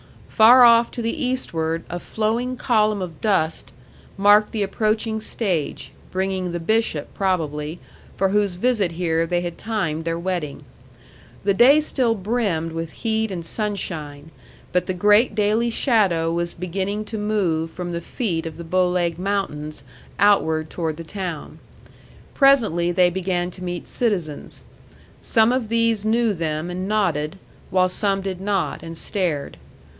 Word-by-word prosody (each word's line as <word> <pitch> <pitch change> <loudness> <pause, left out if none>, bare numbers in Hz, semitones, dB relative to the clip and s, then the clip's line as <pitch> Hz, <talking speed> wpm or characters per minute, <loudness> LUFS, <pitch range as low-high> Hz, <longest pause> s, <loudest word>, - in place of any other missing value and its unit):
Far 240 +3 +7
off 235 0 +6
to 240 - -5
the 250 +7 -2
eastward 165 -11 -1
a 175 - -5
flowing 230 +6 -2
column 215 -5 +1
of 170 -4 -8
dust 165 -7 0 0.5
marked 205 +2 +5
the 215 -2 -1
approaching 220 +2 0
stage, 190 -9 -2 0.2
bringing 190 -1 -2
the 175 - -3
bishop, 195 -4 0
probably, 160 -5 -1 0.4
for 195 0 +2
whose 200 -2 +1
visit 205 -3 +1
here 165 -1 0
they 175 +1 0
had 175 -1 -5
timed 170 -8 -2
their 165 0 -2
wedding. 170 -5 -3 0.8
The 200 0 +2
day 260 +9 +6
still 255 -6 +1
brimmed 195 -6 -1
with 165 0 -5
heat 220 -1 0
and 175 -4 -5
sunshine; 160 -7 -4 0.4
but 180 0 0
the 185 - -2
great 210 +4 +4
daily 215 +3 +2
shadow 195 - +2
was 170 0 -2
beginning 195 +4 -3
to 220 0 -5
move 185 -7 0
from 175 +1 -6
the 170 0 -3
feet 170 -4 -3
of 160 -1 -8
the 170 - -7
Bow 180 +2 +1
Leg 175 -2 -1
Mountains 155 -7 -3 0.3
outward 160 -6 +3
toward 160 -3 -3
the 165 - -7
town. 180 -3 -6 0.7
Presently 225 - +4
they 175 0 +3
began 180 -1 -2
to 185 - -10
meet 175 -1 -5
citizens. 180 -11 -2 0.6
Some 225 0 +3
of 250 -4 -1
these 230 -2 +2
knew 225 0 +2
them 160 -1 -3
and 185 +2 -4
nodded, 175 -7 0 0.3
while 185 0 +3
some 195 +1 0
did 190 -1 -5
not, 195 -3 -1
and 165 0 -8
stared. 170 -9 -2
185 Hz, 150 wpm, -22 LUFS, 165-215 Hz, 0.8 s, Far